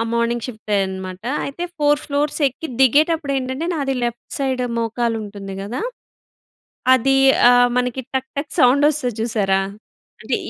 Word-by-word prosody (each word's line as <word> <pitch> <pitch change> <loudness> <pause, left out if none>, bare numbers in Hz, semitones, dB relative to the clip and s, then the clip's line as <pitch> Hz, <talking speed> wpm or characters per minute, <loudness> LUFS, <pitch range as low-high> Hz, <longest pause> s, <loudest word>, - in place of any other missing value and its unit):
ఆ - - +2
మార్నింగ్ 235 0 0
షిఫ్టే 220 -3 -3
అనమాట. 190 -1 -6 0.2
అయితే, 285 +5 -4
4 295 0 +3
ఫ్లోర్స్ 290 +1 -1
ఎక్కి 295 +5 -8
దిగేటప్పుడు 295 +3 +3
ఏంటంటే, 260 +4 -3
నాది 275 -3 -1
లెఫ్ట్ 235 0 -5
సైడ్ 260 -2 -1 0.2
మోకాలుంటుంది 220 -4 -3
కదా! 230 +7 -4 1.1
అది 270 +2 +2 0.3
ఆహ్, 245 0 +5
మనకి 250 +1 0
టక్, 265 0 -1
టక్ 280 0 -4
సౌండ్ 275 +4 +5
ఒస్తది 255 -6 -2
చూసారా? 200 -4 +1 0.6
అంటే, - - -1
250 Hz, 135 wpm, -20 LUFS, 225-280 Hz, 1.1 s, ఆహ్